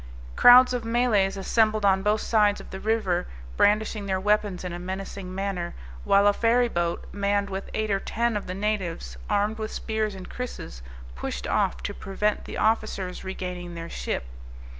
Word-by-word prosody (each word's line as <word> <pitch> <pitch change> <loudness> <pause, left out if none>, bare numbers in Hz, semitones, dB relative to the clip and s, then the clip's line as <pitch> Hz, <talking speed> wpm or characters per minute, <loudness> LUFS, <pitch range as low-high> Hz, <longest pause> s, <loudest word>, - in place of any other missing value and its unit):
Crowds 250 +1 +8
of 245 -2 -2
Malays 225 -5 +2
assembled 215 +1 +2
on 190 -1 +4
both 210 +2 +1
sides 210 -2 +3
of - - -12
the 190 - -6
river, 200 -5 0 0.3
brandishing 210 - +2
their 190 -1 0
weapons 205 -2 +1
in 180 -1 -4
a 175 - -5
menacing 190 0 -6
manner, 195 -3 -3 0.3
while 200 +1 +5
a 205 - +5
ferry 240 +3 +3
boat, 175 -5 -2
manned 200 0 0
with 190 +1 -5
eight 215 -1 -1
or 195 - +2
ten 235 +3 -1
of 205 - -3
the 185 - -4
natives, 190 - -2
armed 210 +2 +1
with 215 0 -4
spears 215 -2 -2
and 185 -1 -9
krisses, 245 - -7 0.3
pushed - - -5
off - - 0
to - - -3
prevent 210 +2 -2
the - - -6
officers' 215 -4 0
regaining 180 -2 -5
their 165 0 -7
ship. - - -3
200 Hz, 175 wpm, -26 LUFS, 185-215 Hz, 0.3 s, Crowds